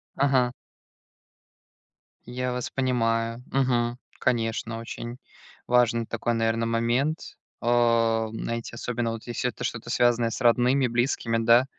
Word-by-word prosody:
Ага. 130 -3 +2 1.7
Я 125 +1 -3
вас 125 -1 -3
понимаю. 115 -2 0
Мгм. 125 -3 +1 0.2
Конечно, 115 -2 -1
очень 120 +1 -7 0.5
важный 120 -1 +3
такой, 115 +1 -2
наверно, 115 0 +1
момент. 120 +7 0 0.2
О, 115 -2 +2
знаете, 115 +1 -4
особенно, 120 -1 -2
если 120 +1 -2
вот 120 - -4
это - - -7
что-то, 120 0 -4
связанное 120 -1 +3
с - - -5
родными, 125 +2 +4
близкими, 120 -1 0
да. 115 +2 +5
120 Hz, 115 wpm, -26 LUFS, 115-125 Hz, 1.7 s, да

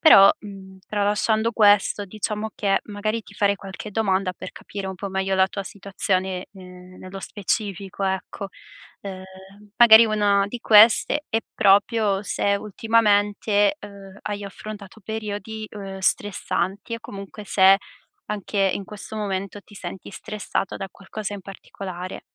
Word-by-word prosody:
però, 195 - +9
mhmm, 195 -2 -11
tralasciando 215 +2 +1
questo, 205 -1 +4
diciamo 215 +2 -4
che, 200 -2 +1
magari, 215 +2 -2
ti 205 - -16
farei 200 +1 +2
qualche 195 +2 -8
domanda, 195 -3 +1
per - - -9
capire 200 -1 -7
un 190 - -6
po' 200 +3 -5
meglio 190 0 -1
la 190 0 +5
tua 200 - -5
situazione, 190 -1 -2
ehm, 180 -1 -13
nello 185 +1 -9
specifico, 200 -1 -3
ecco. 190 +1 -3 0.5
Uhm, 190 -2 -7 0.5
magari 230 -1 +9
una 205 -2 +2
di 245 - -6
queste 225 +8 +6
è, 225 - +1 0.2
proprio 205 0 +3
se 200 0 0
ultimamente, 210 +2 +2
uhm, 200 -1 -11
hai 205 -1 -4
affrontato 205 +1 -9
periodi, 220 0 -5
uhm, 195 -2 -7
stressanti 195 +2 -1
e - - -5
comunque, 200 0 -9
se 195 -1 +6 0.5
anche 210 0 -4 0.2
in - - -4
questo 210 +1 -9
momento 200 -1 -3
ti 205 - -18
senti 185 -1 -8
stressato 205 -2 -4
da 195 - -5
qualcosa 205 +1 -7
in 200 - -7
particolare. 185 -1 -8
200 Hz, 140 wpm, -23 LUFS, 195-210 Hz, 0.5 s, però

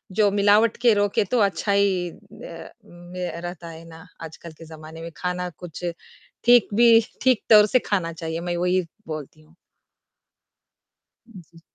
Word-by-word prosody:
जो 210 0 +4
मिलावट 205 +3 +3
के 240 -2 +5
रोकें, 205 0 +1
तो 240 +6 0
अच्छा 200 0 0
ही 195 -3 +1
ना 175 0 -13
में 180 -2 -5
रहता 175 -1 -8
है 165 0 -11
ना, 160 +1 -13 0.2
आजकल 165 +1 -10
के 165 - -12
ज़माने 160 0 -11
में, 165 0 -8
खाना 180 0 -3
कुछ 175 +2 -10 0.6
ठीक 240 0 +6
भी 230 0 +6 0.2
ठीक 255 -4 +2
तौर 210 -1 +8
से 255 +5 +2
खाना 170 -5 -1
चाहिए। 160 0 -5
मैं 175 0 -3
वही 180 +1 +1 0.3
बोलती 155 -1 -8
हूँ। 155 +2 -24 1.7
उ, 210 -5 -12
जी। 165 -1 -18
180 Hz, 160 wpm, -23 LUFS, 165-205 Hz, 1.7 s, तौर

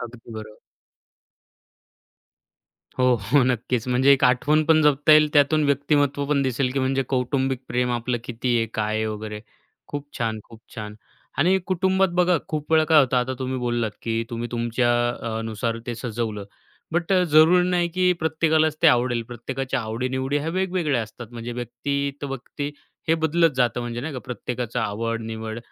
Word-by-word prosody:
अगदी 115 -1 -9
बरं. 110 -1 -9 2.4
हो, 125 - +3
हो, 125 +7 +2
नक्कीच. 125 -1 -1
म्हणजे 130 +3 +4
एक 135 -1 +3
आठवण 145 +5 +3
पण 155 0 +4
जपता 150 +1 +4
येईल, 150 0 +6
त्यातून 150 +1 +4
व्यक्तिमत्व 145 0 +1
पण 140 -1 +1
दिसेल 130 0 0
की 135 - -1
म्हणजे 135 +1 +1
कौटुंबिक 130 0 0
प्रेम 125 0 0
आपलं 120 0 -1
किती 120 0 -1
आहे, 115 -1 +1
काय 110 0 -1
आहे 110 0 0
वगैरे. 105 0 -5 0.5
खूप 145 0 -5
छान, 110 -2 -1
खूप 115 -1 -14
छान. 105 -2 -6 0.4
आणि 185 +6 +4
कुटुंबात 190 +1 +2
बघा 180 -1 +3
खूप 155 -1 -4
वेळा 160 0 +5
काय 160 -1 +5
होतं, 130 -2 +1
आता 125 +1 0
तुम्ही 130 0 -3
बोललात 120 -3 -1
की 115 0 -1
तुम्ही 120 0 -4
तुमच्या 120 +1 0 0.2
अ, 115 -2 -4
नुसार 115 +1 -3
ते 120 - -3
सजवलं, 115 -3 -4 0.5
बट 175 +2 0
अ, 185 -1 +4
जरुरी 170 +3 +5
नाही 175 -1 +1
की 185 0 +3
प्रत्येकालाच 160 -1 +2
ते - - +7
आवडेल. 120 -3 +3
प्रत्येकाच्या 125 +2 -3
आवडी-निवडी 130 +5 -2
ह्या 155 +3 -3
वेगवेगळ्या 175 -8 0
असतात. 110 +2 -9
म्हणजे 120 +1 -6
व्यक्ती 125 +4 -3
त - - -2
व्यक्ती 140 +2 -5 0.4
हे 165 - +5
बदलत 165 +1 +3
जातं. 120 -1 +1
म्हणजे 120 0 -4
नाही 150 +4 -5
का - - -3
प्रत्येकाचा 125 -1 -3
आवड, 115 +2 -3
निवड. 110 0 -5
130 Hz, 170 wpm, -23 LUFS, 115-150 Hz, 2.4 s, ते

